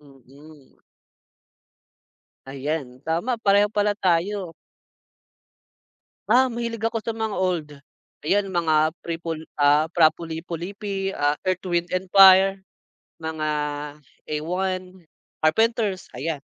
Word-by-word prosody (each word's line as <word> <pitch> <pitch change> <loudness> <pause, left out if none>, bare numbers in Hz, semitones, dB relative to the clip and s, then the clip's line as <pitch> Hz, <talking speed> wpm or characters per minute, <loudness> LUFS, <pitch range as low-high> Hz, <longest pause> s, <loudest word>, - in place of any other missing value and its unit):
Mm. 140 +1 -18 1.7
Ayan, 135 -1 -5
tama, 170 +10 -1
pareho 205 -2 +3
pala 210 0 0
tayo. 185 0 0 1.8
Ah, 255 +4 +4
mahilig 235 -2 -4
ako 225 0 0
sa 225 +1 -4
mga 220 -2 -3
old. 180 -5 -1 0.6
Ayan, 200 +1 +1
mga 160 -3 +2
prepol 165 -1 -5
ah, 145 +1 +4
Fra 165 0 +3
Lippo 165 +1 -6
Lippi, 195 +1 -4
ah, 145 +1 0
Earth, 185 -1 0
Wind& 175 0 +1 0.2
Fire. 195 0 +7 0.6
Mga, 160 -1 -6 0.9
A1, 185 +4 -3 0.4
Carpenters, 210 +3 +1
ayan. 150 -1 -4
175 Hz, 100 wpm, -23 LUFS, 155-200 Hz, 1.8 s, Fire